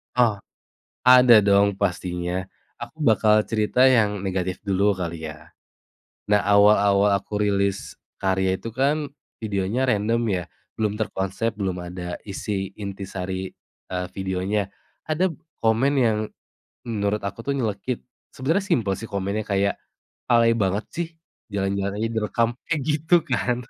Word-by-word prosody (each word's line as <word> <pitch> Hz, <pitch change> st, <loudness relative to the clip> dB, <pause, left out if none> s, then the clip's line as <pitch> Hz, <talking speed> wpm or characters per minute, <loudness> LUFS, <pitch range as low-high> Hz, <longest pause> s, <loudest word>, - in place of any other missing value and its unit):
Oh, 120 Hz, -5 st, +3 dB, 0.7 s
ada 125 Hz, -2 st, +8 dB
dong 100 Hz, -1 st, +3 dB
pastinya. 90 Hz, -1 st, -2 dB, 0.4 s
Aku 120 Hz, +7 st, -9 dB
bakal 110 Hz, -1 st, +4 dB
cerita 115 Hz, +3 st, +3 dB
yang 110 Hz, -6 st, +3 dB
negatif 95 Hz, -1 st, -2 dB
dulu 100 Hz, +1 st, +3 dB
kali 85 Hz, -4 st, -3 dB
ya. 75 Hz, 0 st, -14 dB, 0.7 s
Nah 105 Hz, -1 st, +3 dB
awal-awal 100 Hz, 0 st, +5 dB
aku 105 Hz, +2 st, -4 dB
rilis 100 Hz, -1 st, 0 dB, 0.2 s
karya 95 Hz, -1 st, +1 dB
itu -, -, -6 dB
kan 140 Hz, +5 st, 0 dB, 0.3 s
videonya 105 Hz, +4 st, -1 dB
random 115 Hz, +1 st, +1 dB
ya, 90 Hz, -3 st, -1 dB, 0.3 s
belum 105 Hz, -2 st, 0 dB
terkonsep, 105 Hz, +2 st, -2 dB
belum 95 Hz, -3 st, -2 dB
ada 90 Hz, 0 st, -6 dB
isi 95 Hz, 0 st, -3 dB
intisari, 95 Hz, -2 st, -5 dB, 0.4 s
eee, 90 Hz, 0 st, -3 dB
videonya. 95 Hz, +2 st, -2 dB, 0.4 s
Ada 170 Hz, +4 st, +1 dB
p 150 Hz, -, -17 dB, 0.2 s
komen 115 Hz, +5 st, +3 dB
yang 115 Hz, -5 st, +3 dB, 0.7 s
menurut 105 Hz, -3 st, -1 dB
aku 100 Hz, +6 st, -6 dB
tuh 140 Hz, -, +1 dB
nyelekit, 115 Hz, -1 st, -2 dB, 0.3 s
sebenarnya 160 Hz, +10 st, 0 dB
simpel 115 Hz, -, +1 dB
sih 115 Hz, -, -7 dB
komennya 100 Hz, +2 st, -3 dB
kayak, 100 Hz, 0 st, 0 dB, 0.5 s
"Alay 115 Hz, -1 st, +5 dB
banget 105 Hz, -2 st, 0 dB
sih, 170 Hz, 0 st, -3 dB, 0.4 s
jalan-jalan 100 Hz, -1 st, -2 dB
aja 110 Hz, +2 st, -1 dB
direkam." 115 Hz, +1 st, 0 dB, 0.2 s
Kayak 160 Hz, -3 st, 0 dB
gitu 155 Hz, +4 st, +2 dB
kan. 125 Hz, -3 st, -1 dB
105 Hz, 130 wpm, -24 LUFS, 95-115 Hz, 0.7 s, ada